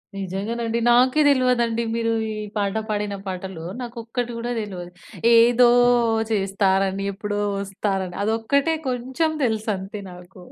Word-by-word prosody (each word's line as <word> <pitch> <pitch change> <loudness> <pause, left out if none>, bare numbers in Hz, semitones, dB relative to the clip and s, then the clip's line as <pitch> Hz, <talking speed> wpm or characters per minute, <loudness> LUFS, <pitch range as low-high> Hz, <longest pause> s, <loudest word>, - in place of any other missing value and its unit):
నిజంగనండి. 225 +5 -3
నాకే 255 +5 +4
దెల్వదండి, 250 -4 +2
మీరూ 230 0 0 0.2
ఈ - - -3 0.2
పాట 200 0 -1
పాడిన 205 -1 -2
పాటలో 185 -3 -6 0.2
నాకొక్కటి 240 0 -4
గూడా 240 +1 -3
దెల్వదు. 180 -4 -6 0.5
ఏదో 240 +1 +6 0.6
చేస్తారని, 195 -1 +1
ఎప్పుడో 205 +1 -3 0.2
వస్తారని 195 -2 -3
అదొక్కటే 250 +9 +1
కొంచం 260 +6 -1
తెలుసంతే 210 -3 -2
నాకూ. 180 +1 -13
215 Hz, 110 wpm, -23 LUFS, 195-240 Hz, 0.6 s, ఏదో